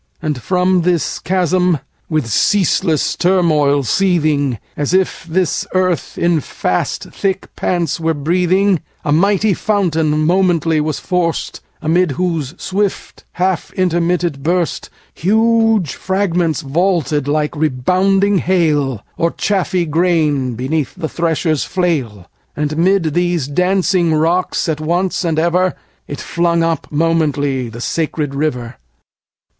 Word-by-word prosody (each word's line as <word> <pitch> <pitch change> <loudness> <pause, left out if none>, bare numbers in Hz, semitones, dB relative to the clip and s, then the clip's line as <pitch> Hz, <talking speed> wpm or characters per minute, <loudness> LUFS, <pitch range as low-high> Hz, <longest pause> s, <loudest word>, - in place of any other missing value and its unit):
And 150 -5 -3
from 180 +2 +2
this 175 -1 0
chasm, 180 -1 +1 0.3
with 155 -5 0
ceaseless 170 - +1
turmoil 155 -6 +2
seethingAs 150 - 0
if 190 -3 0
this 180 -1 0
earth 185 -4 0
in 170 -2 +2
fast - - -2
thick 190 -1 -3
pants 175 -2 -1
were 165 0 0
breathing,A 180 +2 0
mighty 200 +5 +3
fountain 160 -7 0
momently 170 -3 +2
was 155 -1 -2
forced; 180 -3 -2 0.2
Amid 165 0 +2
whose 165 -3 -2
swift 200 +1 -3
half 185 -2 -1
intermitted 175 -4 0
burstHuge 210 +5 0
fragments 180 -4 -1
vaulted 150 -2 0
like 150 +1 0
rebounding 185 +8 +2
hail, 150 - +1
Or 170 - +2
chaffy 185 -2 -1
grain 155 -6 +1
beneath 135 +4 -2
the 160 - -4
thresher's 160 -2 0
flail:And 150 - -3
'mid 170 -2 +2
these 175 -4 0
dancing 180 +1 +1
rocks 170 +5 0
at 155 -2 -2
once 175 +5 0
and 165 -3 -1
everIt 175 +2 +1 0.4
flung 170 -1 0
up 165 -2 -1
momently 145 -5 0
the 115 +1 -9
sacred 150 -1 -2
river. 125 -5 -3
170 Hz, 110 wpm, -16 LUFS, 150-185 Hz, 0.4 s, mighty